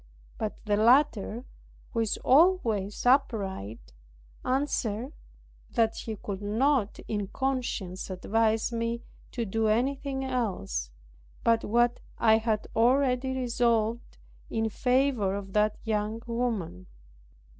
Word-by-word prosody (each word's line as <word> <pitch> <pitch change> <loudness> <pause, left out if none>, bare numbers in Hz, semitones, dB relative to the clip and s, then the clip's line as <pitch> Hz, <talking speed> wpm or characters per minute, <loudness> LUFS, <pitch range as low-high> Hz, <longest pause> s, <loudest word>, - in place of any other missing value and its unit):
But 215 +1 -4
the 205 -1 +2
latter, 235 -1 +3 0.5
who 230 - -2
is 225 -2 0
always 250 - +3
upright, 190 - 0 0.5
answered 255 -2 -1 0.6
that 225 -2 +1
he 220 - -5
could 200 -1 -6
not 225 +2 +1
in 205 -2 -2
conscience 235 -8 -3
advise 220 +5 +1
me 230 0 -2 0.3
to 235 -2 -2
do 220 +2 0
anything 265 +4 0
else, 190 - -2 0.5
but 230 -1 +3
what 240 +2 +2 0.2
I 220 -1 +5
had 220 -1 -1
already 260 +2 +2
resolved, 235 -2 0 0.3
in 225 0 0
favour 250 -4 +1
of 195 -1 -7
that 210 0 +2
young 220 +1 -2
woman. 230 - -3
225 Hz, 110 wpm, -28 LUFS, 210-250 Hz, 0.6 s, I